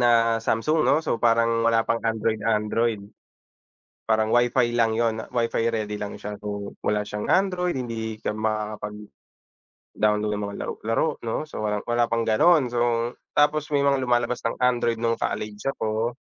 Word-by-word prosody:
na 115 -1 +4
Samsung, 150 +9 +1
'no? - - +4
So, - - 0
parang 115 0 +3
wala 115 -1 +3
pang 115 0 0
Android 110 -1 0
Android. 110 0 +1 1.1
Parang 110 0 +2
wifi 120 0 +3
lang 115 -2 +3
'yon, 115 -1 0
wifi 115 -1 0
ready 105 -2 -2
lang 105 0 -5
siya. 105 0 -6
So, 100 -1 -5
wala 105 0 +1
siyang 105 0 -4
Android, 180 -2 +2
hindi 115 -3 -4
ka - - -2
makakapag-download 105 -1 -4 1.1
ng 105 - -3
mga 100 0 -6
laro - - -3
laro, 115 +8 +2 0.2
'no? 115 +6 -2
So, - - -6
walang 105 -1 -2
wala 120 0 +3
pang 115 0 0
gano'n. 130 +5 +4
So, 120 0 +1 0.2
tapos 150 +1 +3
may 140 - +3
mga 140 -1 +2
lumalabas 120 -1 0
ng 115 - -1
Android 120 -2 +2
nung 115 0 +1
college 105 -1 -4
ako, 110 +2 -2
115 Hz, 160 wpm, -24 LUFS, 110-120 Hz, 1.1 s, na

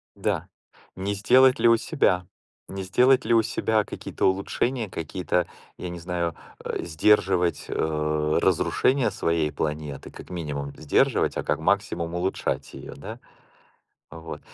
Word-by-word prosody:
Да. - - -2 0.5
Не 100 +2 -2
сделать 130 +6 +5
ли 120 - +4
у 115 0 +6
себя? 90 - +1 0.4
Не 95 0 -5
сделать 125 +7 +4
ли 115 - +2
у 115 - +6
себя 110 0 0
какие-то - - -4
улучшения, 110 +4 -1
какие-то, 90 +1 -2 0.3
я 90 - -5
не 85 0 -6
знаю, 85 -1 -2 0.3
э, - - -3
сдерживать, 90 -1 +2
э, 75 -1 0
разрушения 130 -5 +2
своей 85 -4 0
планеты. 75 -2 -4
Как - - -12
минимум- 75 -5 -4
сдерживать, 75 -2 +2
а - - -2
как - - 0
максимум- 85 0 0
улучшать 90 +2 -2
её, - - -9
да? - - -8 0.9
Вот. 80 +1 -8
90 Hz, 135 wpm, -25 LUFS, 80-105 Hz, 0.9 s, у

